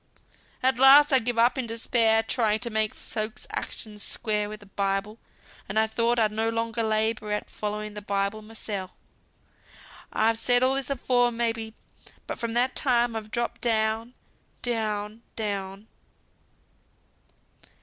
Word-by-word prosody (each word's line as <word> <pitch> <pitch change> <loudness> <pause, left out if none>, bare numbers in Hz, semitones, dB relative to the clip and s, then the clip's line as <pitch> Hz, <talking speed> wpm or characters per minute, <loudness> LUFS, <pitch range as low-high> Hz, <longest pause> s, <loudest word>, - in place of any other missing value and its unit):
"At 260 -1 +2
last 280 +2 +8
I 265 - +6
gave 240 0 -2
it - - +5
up 240 +2 +3
in 250 - -2
despair, 225 -1 +2
trying 220 -1 +1
to 235 - -4
make 215 -1 0
folks' 215 -1 -5
actions 210 -2 -4
square 210 -2 0
wi' 215 - -6
th' 205 -2 -18
Bible; 200 +2 -1 0.5
and 195 - -3
I 220 - +5
thought 235 +2 +1
I'd 220 -2 +2
no 220 +1 0
longer 230 0 -2
labour 220 -1 0
at 210 - -3
following 210 0 -4
th' 210 -1 -9
Bible 200 +2 -1
mysel. 210 -3 -6 1.2
I've 225 +1 +2
said 245 +1 +4
all 260 +1 +3
this 270 -1 -2
afore, 245 -2 +2
may 235 -1 0
be. 225 -1 -8 0.5
But - - -6
from 235 -1 -2
that 250 +2 +2
time 240 -3 +2
I've 215 -1 -5
dropped 235 +2 -3
down, 225 +1 0 0.5
down, 215 -2 -2
down." 200 -1 -4
225 Hz, 150 wpm, -26 LUFS, 210-235 Hz, 1.2 s, last